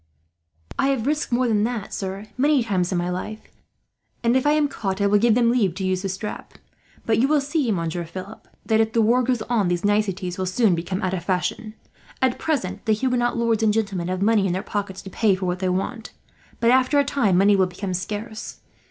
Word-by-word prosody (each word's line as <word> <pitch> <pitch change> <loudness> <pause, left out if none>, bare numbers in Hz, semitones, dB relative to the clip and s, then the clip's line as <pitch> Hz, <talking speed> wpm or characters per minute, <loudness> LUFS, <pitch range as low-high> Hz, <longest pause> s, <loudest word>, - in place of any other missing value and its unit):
"I 270 - +3
have 265 -5 0
risked 300 0 -1
worse 245 +1 +2
than 210 -2 +2
that, 230 -4 -4
sir, 195 +1 -4
many 280 0 +3
times 185 -4 0
in 180 - 0
my 175 +1 -1
life; 215 +4 -5 0.8
and 235 +1 +3
if 260 +2 +2
I 295 - +5
am 300 -1 +3
caught, 195 -7 -3
I 200 - +2
will 205 +1 +4
give 230 0 +4
them 235 -1 +3
leave 205 -8 +1
to 190 - -3
use 185 0 0
the 195 - -3
strap. 195 +3 -6 0.5
But 220 -1 +2
you 260 - +4
will 300 +1 +3
see, 280 -3 0
Monsieur 170 -2 -2
Philip, 185 +5 -9 0.2
that 220 -1 +2
if 220 0 -1
the 230 - +3
war 240 +4 +4
goes 245 -2 0
on 220 -5 +1
these 175 +2 -1
niceties 195 -3 0
will 185 - -1
soon 200 +1 +3
become 180 +3 -3
out 185 0 0
of 180 -3 -3
fashion. 205 +4 -2 0.4
At 260 -1 +1
present 270 - -2
the 220 - +4
Huguenot 245 +1 0
lords 230 -2 +1
and 220 -1 +3
gentlemen 200 -5 -1
have 185 +1 -1
money 210 -2 +3
in 175 - -1
their 190 +2 -2
pockets 200 -3 -4
to 190 - -9
pay 210 -2 +2
for 185 0 -4
what 180 0 -1
they 185 -1 0
want, 205 +5 -3 0.5
but 235 0 +4
after 260 +3 +3
a 285 - +5
time 230 -10 +2
money 200 +2 +5
will 190 -1 +3
become 185 +1 -5
scarce. 210 +4 -5
210 Hz, 230 wpm, -23 LUFS, 185-240 Hz, 0.8 s, I